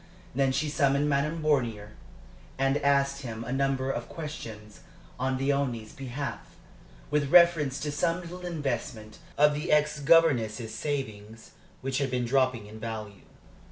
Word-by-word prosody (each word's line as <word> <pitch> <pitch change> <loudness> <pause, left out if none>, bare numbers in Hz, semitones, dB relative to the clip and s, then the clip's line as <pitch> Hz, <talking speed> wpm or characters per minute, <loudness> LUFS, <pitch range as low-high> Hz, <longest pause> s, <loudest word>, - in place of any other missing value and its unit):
Then 135 +1 +2
she 155 +4 0
summoned 140 0 +2
Madame 150 +3 0
Bornier, 120 -9 0 0.7
and 135 +1 +2
asked 140 0 +2
him 115 -3 -6
a 120 +2 -4
number 135 -1 0
of 120 -2 -5
questions 115 -10 -8 0.4
on 130 +1 0
Léonie's 135 -5 -1
behalf, 135 -1 -5 0.7
with 145 -2 +1
reference 160 -5 +5
to 150 - -2
some 165 +4 0
little 180 +1 -9
investment 125 -10 -4 0.2
of 150 +1 +5
the 150 +3 -3
ex 150 0 +3
governess's 130 -8 +3
savings, 110 -7 -5 0.3
which 135 0 -1
had 140 -1 0
been 125 -1 -1
dropping 130 -3 +1
in 110 +1 -11
value. 110 -3 -6
135 Hz, 140 wpm, -28 LUFS, 115-150 Hz, 0.7 s, reference